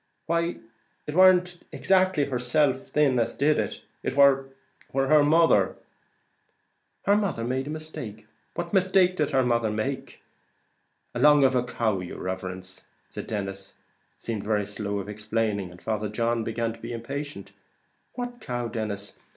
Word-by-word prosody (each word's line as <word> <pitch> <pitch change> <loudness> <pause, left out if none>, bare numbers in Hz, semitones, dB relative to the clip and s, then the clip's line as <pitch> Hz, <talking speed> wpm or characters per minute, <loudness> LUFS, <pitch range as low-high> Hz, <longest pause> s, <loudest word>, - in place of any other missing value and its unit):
"Why 170 +1 0 0.5
it 150 - -5
warn't 180 0 +5
exactly 185 -5 +2
herself 130 +1 +1
thin 140 -4 +2
as 115 - 0
did 150 +2 +2
it; - - -3 0.2
it - - -3
war 135 -1 +5 0.5
her 135 +2 +5
mother." 165 +3 +4 1.3
"Her 200 - +5
mother 200 - 0
made 130 +3 -2
a - - -5
mistake! 155 -9 -7 0.3
What - - -4
mistake 185 -1 +4
did 150 -2 +1
her 135 -3 +2
mother 115 -2 +1
make?" 110 +6 -4 0.9
"Along 145 +3 +5
of 135 0 +4
the 125 -1 +2
cow, 110 -5 -1
yer 90 -1 -7
riverence." 95 0 -6 0.3
Denis 95 -2 -5 0.4
seemed 110 -3 -4
very 105 -1 0
slow 100 0 -4
of 100 0 -4
explaining, 105 -2 -2
and 90 0 -14
Father 105 0 -2
John 115 +1 0
began 115 0 -2
to 115 - -14
be 115 +1 -6
impatient. 140 +6 -6 0.6
"What 245 -1 -5
cow, 120 - -3
Denis? 105 -3 -5
125 Hz, 145 wpm, -26 LUFS, 110-150 Hz, 1.3 s, warn't